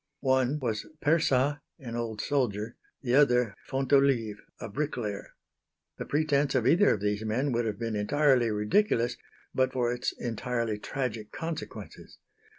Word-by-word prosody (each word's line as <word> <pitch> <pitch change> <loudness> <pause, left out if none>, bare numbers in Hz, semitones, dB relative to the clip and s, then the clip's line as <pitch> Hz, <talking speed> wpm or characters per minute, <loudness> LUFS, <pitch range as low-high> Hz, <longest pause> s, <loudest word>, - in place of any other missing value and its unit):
One 130 +1 +2
was 115 -7 -3
Persat, 145 -3 +2 0.2
an 120 -4 -7
old 115 -2 -3
soldier; 120 -6 -1 0.3
the 120 -2 0
other, 125 -6 +4 0.2
Fontolive, 135 -5 +2 0.2
a - - -5
bricklayer. 115 -4 -4 0.6
The - - -3
pretence 145 -2 +1
of 125 -3 +2
either 175 +10 +5
of 100 - -8
these 105 +1 -1
men 125 +6 0
would 120 -1 0
have 105 -2 -2
been 115 -1 -3
entirely 130 +2 +3
ridiculous 120 - +1 0.4
but 130 0 +2
for 120 -2 +1
its 125 0 -2
entirely 115 -2 -2
tragic 115 -4 -4
consequences. 155 - -7
125 Hz, 140 wpm, -29 LUFS, 110-140 Hz, 0.6 s, either